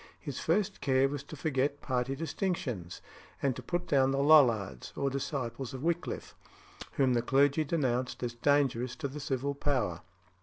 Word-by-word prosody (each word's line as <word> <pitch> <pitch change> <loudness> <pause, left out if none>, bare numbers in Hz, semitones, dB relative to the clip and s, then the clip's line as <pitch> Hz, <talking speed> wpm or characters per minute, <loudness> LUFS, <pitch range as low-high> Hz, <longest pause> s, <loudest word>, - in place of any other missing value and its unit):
His - - -6
first 205 -1 0
care 130 0 +3
was 140 0 -4
to 155 - -9
forget 145 -1 0
party 130 0 -1
distinctions, 135 - -3 0.4
and 135 -3 0
to - - -6
put 175 0 -2
down 135 -2 +3
the 135 - 0
Lollards, 115 - +4
or 140 0 0
disciples 135 -2 -3
of 130 - -7
Wickliffe, 170 +1 -2 0.6
whom 130 -2 +2
the 120 - +2
clergy 140 +5 +3
denounced 130 -6 -1
as 120 -1 -2
dangerous 130 -1 +1
to 150 - -3
the 140 +2 -7
civil 140 -1 -2
power. 130 - -1
135 Hz, 160 wpm, -31 LUFS, 125-145 Hz, 0.6 s, Lollards